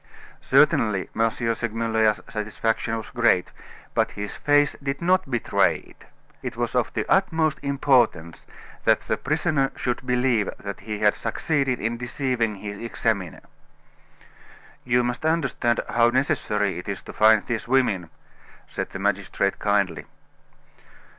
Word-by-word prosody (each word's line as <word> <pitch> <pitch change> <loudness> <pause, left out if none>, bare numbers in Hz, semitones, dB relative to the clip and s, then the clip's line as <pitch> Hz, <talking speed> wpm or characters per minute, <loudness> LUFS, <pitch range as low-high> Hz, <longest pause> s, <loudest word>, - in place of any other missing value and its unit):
Certainly, 105 -4 +3
M. 115 0 +3
Segmuller's 115 -1 0
satisfaction 110 +2 -2
was 110 - -8
great; 120 -8 +2 0.4
but - - +2
his 100 0 -5
face 145 0 +3
did 135 0 -3
not 180 -3 +2
betray 120 -3 +2
it. - - -18 0.4
It - - -6
was - - -2
of - - +1
the - - -1
utmost 160 -5 +2
importance 130 - +1 0.4
that - - +3
the - - -1
prisoner 150 -3 0
should 125 0 -2
believe 125 -4 +1
that 100 -1 -7
he 105 +1 -5
had 105 0 +3
succeeded 135 +2 -1
in 115 +2 -2
deceiving 120 -3 -1
his 100 0 -7
examiner. 110 -6 -2 1.4
"You 125 0 +2
must 120 +3 -3
understand 145 -7 +1
how 120 0 +3
necessary 110 - 0
it 90 - -8
is 100 - -4
to - - -10
find 110 -1 +5
these 115 -2 -3
women," 110 -10 +1 0.6
said - - -4
the - - -7
magistrate 100 0 -1
kindly. 100 -5 0
115 Hz, 135 wpm, -24 LUFS, 105-135 Hz, 1.4 s, find